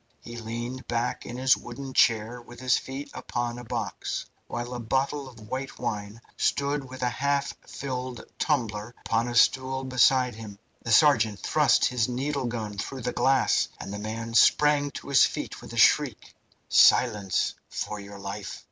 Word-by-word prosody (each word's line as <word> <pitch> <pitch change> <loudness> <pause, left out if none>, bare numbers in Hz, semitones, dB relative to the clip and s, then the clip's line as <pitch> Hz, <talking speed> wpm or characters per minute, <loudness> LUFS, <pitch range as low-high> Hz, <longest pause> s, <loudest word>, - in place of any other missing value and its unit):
He 120 - -10
leaned 120 +2 -5
back 120 +1 -2
in 120 - -6
his 130 0 +4
wooden 130 +2 -8
chair 115 +1 +2
with 120 0 -13
his 130 -1 +3
feet 135 +2 -5
upon 120 0 -3
a - - -8
box, 110 - -4 0.2
while 120 +1 -4
a 125 - -4
bottle 135 +4 -1
of 120 -4 -15
white 130 +1 -5
wine 105 +1 -4 0.2
stood 140 -1 0
with 130 0 -7
a 125 - +2
half 140 0 +1
filled 130 -2 -5
tumbler 110 0 -1
upon 115 +1 +1
a 120 - -4
stool 130 +2 +3
beside 130 -1 +3
him. 105 -2 -9 0.2
The 115 - -4
sergeant 110 -5 +4
thrust - - +3
his 120 -3 +1
needle 135 +1 -2
gun 110 -4 -4
through 130 +6 -5
the 125 - -2
glass, 130 +2 +3
and 100 - -6
the 105 - -5
man 115 +2 -5
sprang 145 +4 +4
to 140 - -9
his 140 - +6
feet - - -6
with - - -11
a - - -7
shriek. - - +3 0.3
"Silence, 105 -7 +4 0.2
for 105 - -4
your 100 0 -10
life! 100 +1 -6
120 Hz, 170 wpm, -27 LUFS, 115-130 Hz, 0.3 s, his